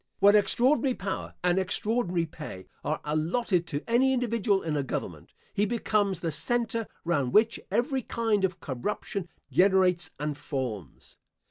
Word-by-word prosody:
When 205 Hz, +1 st, +6 dB
extraordinary 250 Hz, +5 st, +3 dB
power 195 Hz, 0 st, -4 dB
and 180 Hz, +1 st, +3 dB
extraordinary 190 Hz, -2 st, 0 dB
pay 150 Hz, -, -9 dB, 0.2 s
are 155 Hz, -, -1 dB
allotted 170 Hz, +4 st, 0 dB
to 145 Hz, -2 st, -3 dB
any 255 Hz, +3 st, +4 dB
individual 230 Hz, -5 st, +1 dB
in 160 Hz, -2 st, -1 dB
a 145 Hz, -, +1 dB
government, 135 Hz, -, -5 dB, 0.2 s
he 205 Hz, +1 st, +1 dB
becomes 205 Hz, -5 st, 0 dB
the 165 Hz, -, -1 dB
center, 230 Hz, +8 st, -1 dB, 0.2 s
round 145 Hz, -7 st, 0 dB
which 225 Hz, +2 st, +4 dB
every 260 Hz, +2 st, +1 dB
kind 225 Hz, -4 st, 0 dB
of 185 Hz, -1 st, 0 dB
corruption 170 Hz, -, -4 dB, 0.2 s
generates 180 Hz, +2 st, +3 dB
and 150 Hz, 0 st, -2 dB
forms. 125 Hz, -, -6 dB
190 Hz, 140 wpm, -28 LUFS, 160-230 Hz, 0.2 s, When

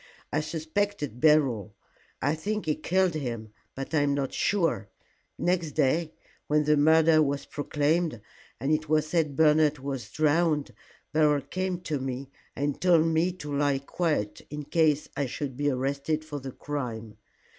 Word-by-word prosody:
"I 150 Hz, -, +2 dB
suspected 155 Hz, -, -2 dB
Beryl. 130 Hz, -10 st, +3 dB, 0.5 s
I 145 Hz, +2 st, +2 dB
think 210 Hz, +7 st, -3 dB
he 155 Hz, -, +2 dB
killed 185 Hz, +2 st, +1 dB
him, 120 Hz, -7 st, -4 dB, 0.3 s
but 135 Hz, +3 st, -6 dB
I 155 Hz, -, +4 dB
am 145 Hz, -1 st, +2 dB
not 135 Hz, -2 st, -2 dB
sure. 165 Hz, -, 0 dB, 0.5 s
Next 175 Hz, -4 st, 0 dB
day, 155 Hz, +3 st, +1 dB, 0.4 s
when 150 Hz, 0 st, +3 dB
the 150 Hz, 0 st, +3 dB
murder 160 Hz, +1 st, +5 dB
was 140 Hz, -1 st, 0 dB
proclaimed, 150 Hz, 0 st, 0 dB, 0.4 s
and 135 Hz, +5 st, -1 dB
it 155 Hz, 0 st, 0 dB
was 155 Hz, -1 st, +3 dB
said 155 Hz, -3 st, 0 dB
Bernard 150 Hz, 0 st, +4 dB
was 135 Hz, -2 st, -5 dB
drowned, 155 Hz, -1 st, +1 dB, 0.4 s
Beryl 150 Hz, -2 st, +3 dB
came 185 Hz, +5 st, -3 dB
to 155 Hz, -5 st, -2 dB
me, 135 Hz, +1 st, -5 dB, 0.2 s
and 145 Hz, 0 st, -2 dB
told 170 Hz, -3 st, +5 dB
me 165 Hz, +2 st, +2 dB
to 150 Hz, -5 st, -6 dB
lie 140 Hz, -1 st, +2 dB
quiet 140 Hz, -5 st, -2 dB
in 150 Hz, 0 st, -5 dB
case 155 Hz, -1 st, +2 dB
I 140 Hz, -, -1 dB
should 135 Hz, +1 st, -4 dB
be 145 Hz, +2 st, +1 dB
arrested 140 Hz, +4 st, -1 dB
for 145 Hz, -2 st, -5 dB
the 135 Hz, 0 st, -7 dB
crime. 115 Hz, -7 st, -5 dB
150 Hz, 155 wpm, -27 LUFS, 140-160 Hz, 0.5 s, murder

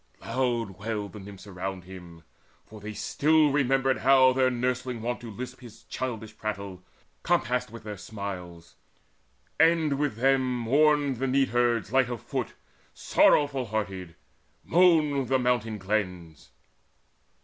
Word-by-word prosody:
Loud 120 Hz, -7 st, -2 dB
wailed 105 Hz, -1 st, -4 dB
the 105 Hz, -, -8 dB
Nymphs 100 Hz, -1 st, -11 dB
around 95 Hz, -1 st, -5 dB
him; 90 Hz, -3 st, -12 dB, 0.4 s
for 110 Hz, -, -12 dB
they 105 Hz, +1 st, -6 dB
still 150 Hz, +7 st, +2 dB
Remembered 135 Hz, -1 st, +2 dB
how 130 Hz, -1 st, +5 dB
their 130 Hz, 0 st, +3 dB
nursling 125 Hz, 0 st, -2 dB
wont 120 Hz, +1 st, -3 dB
to 120 Hz, -, -8 dB
lisp 125 Hz, +4 st, -7 dB
His 115 Hz, -3 st, -14 dB
childish 110 Hz, -4 st, -5 dB
prattle, 100 Hz, -3 st, -5 dB, 0.4 s
compassed 125 Hz, +2 st, 0 dB
with 115 Hz, -1 st, -11 dB
their 105 Hz, -1 st, -6 dB
smiles. 90 Hz, -5 st, -8 dB, 0.9 s
And 160 Hz, -4 st, +3 dB
with 145 Hz, -6 st, 0 dB
them 130 Hz, +1 st, +2 dB
mourned 145 Hz, +3 st, +2 dB
the 135 Hz, +3 st, -1 dB
neatherds 120 Hz, -4 st, +1 dB
light 130 Hz, -2 st, +3 dB
of 120 Hz, -2 st, -4 dB
foot, -, -, -4 dB, 0.4 s
Sorrowful 140 Hz, -3 st, +3 dB
hearted; 95 Hz, -5 st, -4 dB, 0.5 s
moaned 155 Hz, -6 st, +3 dB
the 130 Hz, +2 st, +2 dB
mountain 120 Hz, -4 st, 0 dB
glens. 90 Hz, -6 st, -3 dB
120 Hz, 130 wpm, -27 LUFS, 100-130 Hz, 0.9 s, how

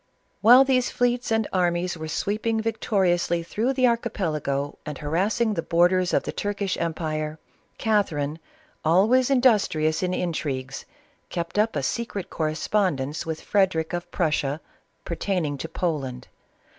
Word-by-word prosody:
While 245 Hz, +5 st, +8 dB
these 260 Hz, -2 st, +2 dB
fleets 245 Hz, 0 st, 0 dB
and 225 Hz, -1 st, +2 dB
armies 175 Hz, -1 st, +1 dB
were 160 Hz, -1 st, -6 dB
sweeping 215 Hz, +7 st, -1 dB
victo 220 Hz, -1 st, -2 dB
riously 175 Hz, -2 st, +1 dB
through 230 Hz, +9 st, -1 dB
the 255 Hz, -1 st, +2 dB
Archipelago, 155 Hz, -, -1 dB
and 150 Hz, -2 st, -6 dB
harassing 200 Hz, +9 st, 0 dB
the 165 Hz, -, -1 dB
borders 175 Hz, +2 st, +2 dB
of -, -, +2 dB
the -, -, -4 dB
Turkish 205 Hz, -1 st, -2 dB
empire, 155 Hz, -2 st, -2 dB, 0.4 s
Catherine, 160 Hz, -9 st, 0 dB, 0.4 s
always 215 Hz, -, +4 dB
in 270 Hz, -2 st, +3 dB
dustrious 160 Hz, -10 st, +3 dB
in 185 Hz, -, 0 dB
intrigues^ept 165 Hz, +2 st, -4 dB
up 220 Hz, +1 st, +2 dB
a -, -, -1 dB
secret 225 Hz, -5 st, -3 dB
correspondence 155 Hz, -2 st, -1 dB
with 160 Hz, -1 st, -3 dB
Frederic 180 Hz, -5 st, +1 dB
of 175 Hz, 0 st, -4 dB
Prussia, 150 Hz, -3 st, 0 dB, 0.5 s
pertaining 170 Hz, -3 st, -1 dB
to 165 Hz, -, -5 dB
Poland. 140 Hz, -8 st, -3 dB
175 Hz, 130 wpm, -25 LUFS, 155-215 Hz, 0.5 s, While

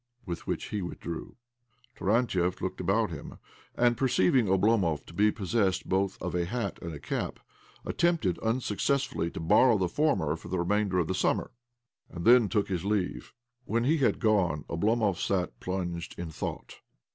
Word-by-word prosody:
With 85 Hz, -2 st, -6 dB
which -, -, -3 dB
he 105 Hz, -, -2 dB
with 90 Hz, -, -6 dB
drew. 85 Hz, -1 st, -6 dB, 0.6 s
Taxantiev 95 Hz, -4 st, +1 dB
looked 95 Hz, -, -3 dB
about 100 Hz, +5 st, +1 dB
him, -, -, -8 dB, 0.4 s
and, 120 Hz, 0 st, +3 dB
per 135 Hz, +3 st, +1 dB
ceiving 115 Hz, +1 st, +3 dB
Oblomov 95 Hz, -5 st, +2 dB
to -, -, -13 dB
be 105 Hz, +5 st, +3 dB
possessed 100 Hz, -2 st, 0 dB
both 95 Hz, +1 st, 0 dB
of 90 Hz, -, -4 dB
a 90 Hz, -1 st, 0 dB
hat 120 Hz, +6 st, -3 dB
and 85 Hz, -, -5 dB
a 75 Hz, -, -6 dB
cap, -, -, -3 dB, 0.5 s
attempted 165 Hz, -, +1 dB
unsuccessfully 115 Hz, -3 st, 0 dB
to -, -, -7 dB
borrow 110 Hz, +8 st, +5 dB
the 95 Hz, -2 st, +1 dB
former 85 Hz, -, +1 dB
for 85 Hz, -, -11 dB
the 90 Hz, +2 st, -2 dB
remainder 95 Hz, +2 st, +1 dB
of 90 Hz, -, +2 dB
the 95 Hz, -, -1 dB
summer, 95 Hz, -, 0 dB, 0.6 s
and 85 Hz, -1 st, -7 dB
then 120 Hz, -3 st, +6 dB
took 105 Hz, -3 st, +1 dB
his 90 Hz, -3 st, -2 dB
leave. 100 Hz, -2 st, -2 dB, 0.3 s
When 115 Hz, 0 st, 0 dB
he 155 Hz, +6 st, +3 dB
had 135 Hz, -, +2 dB
gone 95 Hz, -9 st, +1 dB
Oblomov 105 Hz, +2 st, +1 dB
gat 90 Hz, -2 st, -1 dB
plunged 90 Hz, -2 st, -4 dB
in 85 Hz, -2 st, -5 dB
thought. -, -, -6 dB
95 Hz, 170 wpm, -29 LUFS, 85-115 Hz, 0.6 s, then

